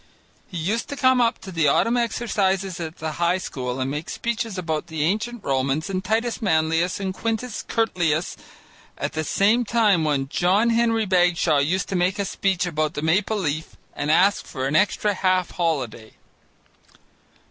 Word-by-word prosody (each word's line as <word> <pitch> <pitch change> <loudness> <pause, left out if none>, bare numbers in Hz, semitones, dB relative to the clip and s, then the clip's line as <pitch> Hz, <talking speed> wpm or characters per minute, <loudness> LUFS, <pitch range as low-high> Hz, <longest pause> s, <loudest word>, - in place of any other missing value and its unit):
He 180 - -7
used 200 +8 -2
to 285 - -4
come 260 -2 +3
up 235 0 +2
to 190 - -8
the 165 -4 +1
autumn 230 - +3
exercises 195 -6 0
at 160 -1 -6
the 160 0 -4
high 175 +2 +3
school 125 -7 -4
and 130 +1 -1
make 150 +3 -5
speeches 230 -3 -3
about 160 -2 -2
the 160 -3 -2
ancient 215 +6 -1
Romans 135 +6 -1
and 185 -1 -2
Titus 225 +5 -1
Manlius 165 -2 +1
and 190 -1 -3
Quintus 225 +3 -3
Curtius 175 -8 0 0.6
at - - -3
the 155 - -2
same 210 +9 +2
time 210 -7 +2
when 140 -3 0
John 195 +10 +2
Henry 230 -1 +2
Bagshaw 175 -5 +3
used 170 +7 0
to 195 - -2
make 180 +3 +1
a 200 - -1
speech 190 -2 0
about 155 -2 -1
the 150 - -3
Maple 190 +7 +1
Leaf 160 -4 -3 0.2
and 145 +1 -3
ask 190 +6 +3
for 130 -1 -4
an 140 +3 -1
extra 205 +4 +2
half 185 -2 +1
holiday. 135 -10 -2
180 Hz, 170 wpm, -23 LUFS, 155-215 Hz, 0.6 s, come